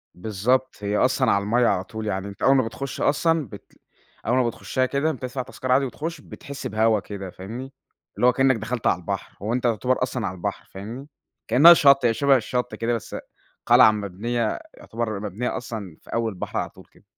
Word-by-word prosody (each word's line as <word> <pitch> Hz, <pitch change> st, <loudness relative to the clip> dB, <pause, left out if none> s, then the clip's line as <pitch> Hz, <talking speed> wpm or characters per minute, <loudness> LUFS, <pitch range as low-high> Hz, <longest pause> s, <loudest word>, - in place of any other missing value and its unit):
بالضبط، 110 Hz, +7 st, 0 dB
هي 105 Hz, +1 st, 0 dB
أصلًا 130 Hz, +2 st, +2 dB
على 100 Hz, -, +2 dB
المَيّة 120 Hz, +4 st, +2 dB
على 95 Hz, -4 st, +1 dB
طول، 110 Hz, +2 st, -6 dB
يعني 95 Hz, -1 st, -2 dB
أنت 100 Hz, -, -11 dB
أول 135 Hz, -, +6 dB
ما 130 Hz, -, +4 dB
بتخش 135 Hz, +4 st, -6 dB
أصلًا 160 Hz, 0 st, +2 dB
بت -, -, -13 dB, 0.5 s
أول 125 Hz, +3 st, +2 dB
ما 125 Hz, -2 st, +3 dB
بتخشها 130 Hz, +2 st, -1 dB
كده 140 Hz, +4 st, 0 dB
بتدفع 130 Hz, -2 st, -5 dB
تذكرة 130 Hz, 0 st, -2 dB
عادي 135 Hz, +1 st, +3 dB
وتخش، 155 Hz, +6 st, -5 dB
بتحس 140 Hz, -1 st, -8 dB
بهوا 110 Hz, +1 st, +2 dB
كده 100 Hz, -1 st, -7 dB
فاهمني؟ 115 Hz, +10 st, -8 dB, 0.4 s
اللي 125 Hz, -, +3 dB
هو 125 Hz, -, +5 dB
كإنك 135 Hz, +1 st, +3 dB
دخلت 115 Hz, +1 st, -3 dB
عالبحر، 90 Hz, 0 st, -2 dB
هُوأنت 120 Hz, +5 st, -1 dB
يُعتبر 125 Hz, +3 st, +1 dB
أصلًا 125 Hz, -3 st, -2 dB
عالبحر، 90 Hz, -1 st, -4 dB
فاهمني؟ 115 Hz, +8 st, -8 dB, 0.4 s
كإنَّها 145 Hz, +9 st, +9 dB
شطّ، 140 Hz, -5 st, +5 dB
هي 115 Hz, -, +4 dB
شبه 135 Hz, +4 st, +4 dB
الشطّ 125 Hz, +1 st, -2 dB
كده 115 Hz, +1 st, -1 dB
بس، 115 Hz, -, -5 dB, 0.5 s
قلعة 110 Hz, -, +7 dB
مبنية 105 Hz, +3 st, -2 dB
يعتبر 110 Hz, -3 st, -4 dB
مبنية 105 Hz, +4 st, -3 dB
أصلًا 110 Hz, -7 st, -7 dB
في -, -, -12 dB
أول 115 Hz, -1 st, 0 dB
البحر 90 Hz, -, -5 dB
على -, -, -3 dB
طول -, -, -17 dB
كده. -, -, -24 dB
120 Hz, 190 wpm, -24 LUFS, 105-130 Hz, 0.5 s, كإنَّها